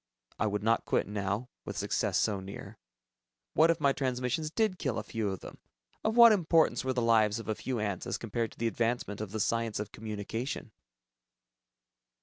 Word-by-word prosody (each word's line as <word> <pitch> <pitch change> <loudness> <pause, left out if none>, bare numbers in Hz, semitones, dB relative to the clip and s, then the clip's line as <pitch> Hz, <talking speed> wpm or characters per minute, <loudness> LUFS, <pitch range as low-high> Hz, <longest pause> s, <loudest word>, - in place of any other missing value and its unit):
I 110 - +2
would 105 -1 -2
not 115 +1 +2
quit - - +1
now, 105 +4 -2
with - - -6
success - - 0
so 105 -3 +1
near. 95 +1 -9 0.7
What 160 +2 +5
if 165 0 +2
my 140 -2 +3
transmissions 130 +4 -1
did 200 0 0
kill 130 -6 -1
a 110 - -2
few 110 -1 -2
of 95 -2 -5
them? - - -10 0.4
Of 220 +2 0
what 235 -1 +10
importance 165 -8 +3
were 130 - 0
the 125 -2 0
lives 110 -2 +4
of 115 - -7
a 110 - +1
few 125 +3 -3
ants 100 -3 -2
as 95 - -1
compared 115 0 -2
to - - -23
the 115 - -2
advancement 115 -2 -1
of 105 -3 -5
the 110 - -3
science 115 0 0
of 105 0 -5
Communication? 110 +4 -5
115 Hz, 190 wpm, -30 LUFS, 105-135 Hz, 0.7 s, what